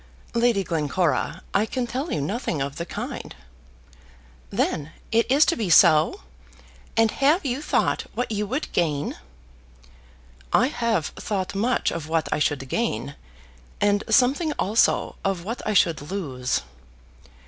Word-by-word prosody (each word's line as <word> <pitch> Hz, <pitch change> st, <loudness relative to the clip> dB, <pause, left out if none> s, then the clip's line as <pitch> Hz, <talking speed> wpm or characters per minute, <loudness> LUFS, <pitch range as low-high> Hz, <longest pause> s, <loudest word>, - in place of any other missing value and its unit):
"Lady 235 Hz, -4 st, +2 dB
Glencora, 165 Hz, +1 st, -1 dB
I 210 Hz, +3 st, +2 dB
can 255 Hz, +1 st, -2 dB
tell 265 Hz, +7 st, -4 dB
you 150 Hz, -, -1 dB
nothing 170 Hz, -, -2 dB
of 140 Hz, +1 st, -3 dB
the 170 Hz, -, -4 dB
kind." -, -, -6 dB, 1.1 s
"Then 150 Hz, -, -1 dB, 0.2 s
it 230 Hz, +2 st, +2 dB
is 285 Hz, +3 st, +6 dB
to 335 Hz, -, +2 dB
be 215 Hz, -5 st, -2 dB
so! 155 Hz, -, +5 dB, 0.8 s
And 225 Hz, -1 st, +4 dB
have 295 Hz, +5 st, +2 dB
you 260 Hz, +1 st, -1 dB
thought -, -, 0 dB
what 245 Hz, -1 st, -2 dB
you 210 Hz, -1 st, -1 dB
would 265 Hz, +8 st, -3 dB
gain?" 150 Hz, -4 st, 0 dB, 1.4 s
"I 250 Hz, +4 st, +4 dB
have 230 Hz, -, 0 dB
thought 190 Hz, -3 st, -3 dB
much 230 Hz, +6 st, +1 dB
of 155 Hz, -2 st, -5 dB
what 160 Hz, 0 st, 0 dB
I -, -, -1 dB
should 145 Hz, -3 st, 0 dB
gain: -, -, -2 dB, 0.7 s
and 205 Hz, 0 st, +2 dB
something 285 Hz, +5 st, +3 dB
also 215 Hz, -1 st, +1 dB
of 195 Hz, -3 st, -1 dB
what 230 Hz, +6 st, -4 dB
I 215 Hz, -, 0 dB
should 165 Hz, -5 st, +3 dB
lose." 135 Hz, -10 st, -2 dB
205 Hz, 140 wpm, -24 LUFS, 160-245 Hz, 1.4 s, is